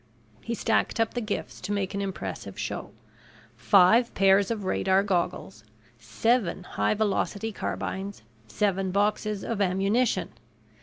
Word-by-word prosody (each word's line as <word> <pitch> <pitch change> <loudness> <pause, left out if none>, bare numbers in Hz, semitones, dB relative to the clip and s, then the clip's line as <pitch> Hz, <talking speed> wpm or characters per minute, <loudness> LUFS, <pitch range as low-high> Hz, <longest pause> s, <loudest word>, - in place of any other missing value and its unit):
He 235 - -3
stacked 225 +1 0
up 225 -1 +1
the 245 - -2
gifts 215 -2 -4
to - - -4
make 200 -1 -1
an 200 - -2
impressive 195 -1 -5
show: - - -4 0.7
five 215 +5 +5
pairs 195 0 +4
of 220 -3 -2
radar 190 +1 +2
goggles, 175 - -2 0.4
seven 210 - 0
high 195 - 0
velocity 215 +1 -1
carbines, 195 - -4 0.2
seven 190 - 0
boxes 205 +1 0
of 225 -3 -2
ammunition. 200 +6 +1
200 Hz, 125 wpm, -27 LUFS, 190-220 Hz, 0.7 s, five